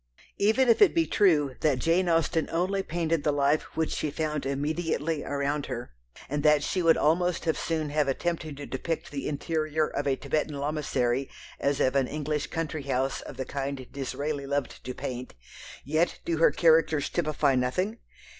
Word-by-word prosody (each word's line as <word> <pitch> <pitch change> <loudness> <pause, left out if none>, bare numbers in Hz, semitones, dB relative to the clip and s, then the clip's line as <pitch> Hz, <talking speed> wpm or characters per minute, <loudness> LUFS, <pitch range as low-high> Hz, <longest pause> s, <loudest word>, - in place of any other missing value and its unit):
Even 220 +6 +3
if 230 - +4
it 410 - +6
be 330 -1 +3
true 155 - +3
that 150 -4 +3
Jane 170 +6 +2
Austen 165 0 +1
only 185 +4 0
painted 165 -3 -1
the 150 - +2
life 145 +1 0
which 160 -1 0
she 155 - -1
found 150 -2 -2
immediately 155 +2 -1
around 145 +1 -2
her, 120 - -5 0.4
and 145 +1 -2
that 150 -1 +4
she 185 - 0
would 165 -1 +5
almost 175 +2 +1
as 160 - 0
soon 155 -3 -2
have 150 -1 +1
attempted 155 +1 -2
to 145 - -6
depict 160 +5 -4
the 140 -2 -4
interior 155 +1 -1
of - - -3
a 135 - +2
Thibetan 150 +2 -2
lamassary 140 -3 -1 0.3
as 140 0 0
of 130 +1 +2
an 135 -2 +3
English 150 0 -2
country 160 -1 -3
house 135 -1 -1
of - - -10
the 130 - -3
kind 135 -1 -4
Disraeli 140 +1 -3
loved 140 0 -3
to 125 0 -5
paint, 125 - -6 0.5
yet 155 +5 +1
do 165 - 0
her 165 - +6
characters 160 -1 +3
"typify 155 -4 +1
nothing?" 180 - 0
150 Hz, 175 wpm, -28 LUFS, 140-165 Hz, 0.5 s, it